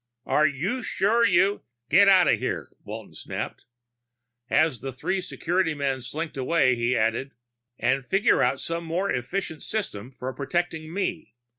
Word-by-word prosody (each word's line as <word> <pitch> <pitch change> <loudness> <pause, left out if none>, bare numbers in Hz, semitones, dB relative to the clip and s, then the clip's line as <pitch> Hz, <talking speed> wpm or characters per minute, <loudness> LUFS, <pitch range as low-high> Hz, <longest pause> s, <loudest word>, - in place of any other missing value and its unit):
"Are 155 +1 +4
you 170 - -2
sure 225 +2 +2
you 200 0 +3
" 120 0 -55
"Get 200 +1 +7
out 190 -2 +6
of - - +3
here," - - -3
Walton - - -8
snapped. - - -6 0.8
As 155 -4 +2
the 135 - -4
three 185 +9 -2
security 180 -2 -1
men 135 -2 -1
slinked 150 +5 -5
away, 130 -1 +3
he 120 +1 +1
added, 115 +5 0 0.4
"And 135 +1 +1
figure 195 - +3
out 130 +2 +2
some 170 0 -3
more 175 +4 -1
efficient 160 +5 -3
system 130 - -4
for 130 +1 -4
protecting 160 +2 -2
me. 175 - -3
160 Hz, 155 wpm, -26 LUFS, 130-185 Hz, 0.8 s, Get